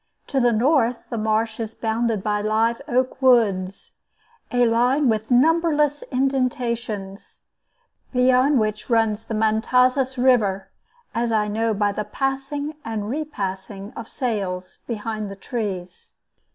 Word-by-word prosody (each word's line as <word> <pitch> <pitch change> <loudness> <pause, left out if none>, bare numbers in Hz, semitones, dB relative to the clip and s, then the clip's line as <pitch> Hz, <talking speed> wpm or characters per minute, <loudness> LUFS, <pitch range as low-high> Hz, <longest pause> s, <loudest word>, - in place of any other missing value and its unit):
To 275 - -1
the 245 -1 +4
north 245 +1 +2
the 235 - -2
marsh 220 +1 0
is 225 -1 -5
bounded 225 -2 -1
by 210 -1 0
live 225 +3 +1
oak 255 0 0
woods, 200 -7 +2 0.5
a 245 0 +3
line 245 +4 +3
with 220 0 -1
numberless 295 +2 +3
indentations, 245 -7 -2 0.7
beyond 255 +2 +4
which 215 +1 -2
runs 225 -2 +2
the 225 - -4
Matanzas 250 +5 +2
River, 215 -7 +2 0.4
as 235 0 0
I 215 -1 +2
know 220 +1 0
by 205 0 +1
the 210 +1 -3
passing 270 +6 -3
and 220 -1 -4
repassing 200 -7 -5
of 230 - -8
sails 195 -8 -3
behind 215 -2 -4
the 195 - -7
trees. 195 -5 -5
230 Hz, 125 wpm, -23 LUFS, 210-255 Hz, 0.7 s, the